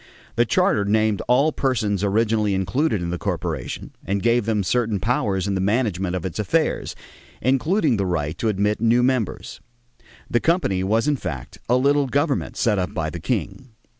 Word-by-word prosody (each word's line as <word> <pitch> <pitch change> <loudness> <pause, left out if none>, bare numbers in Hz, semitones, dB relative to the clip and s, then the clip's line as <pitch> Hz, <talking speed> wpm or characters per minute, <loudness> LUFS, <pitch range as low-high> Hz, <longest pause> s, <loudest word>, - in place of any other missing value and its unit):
The - - +3
charter 105 - +2
named 110 0 +1
all 130 +5 +4
the - - -12
persons 110 -7 0
originally 105 0 +1
included 95 - 0
in 85 - -3
the 90 - -3
corporation 85 -8 -4
and 100 0 -2
gave 120 -1 +2
them 105 -3 +1
certain 115 0 0
powers 100 -5 0
in 100 - -1
the 95 - -1
management 95 -4 0
of 90 - -4
its 95 +2 -4
affairs, 155 +9 0 0.4
including 135 - +2
the 100 - 0
right 80 -3 -1
to 115 - +1
admit 105 +1 0
new 115 +2 +3
members. 125 -5 -1 0.7
The 120 - +1
company 140 - +1
was 110 +7 +1
in 145 -1 +2
fact 75 - -6
a 125 - +4
little 140 +2 +2
government 140 +2 -1
set 105 -4 +2
up 90 - -3
by 80 -1 -2
the 85 - -6
king. 120 - -3
105 Hz, 180 wpm, -22 LUFS, 95-125 Hz, 0.7 s, all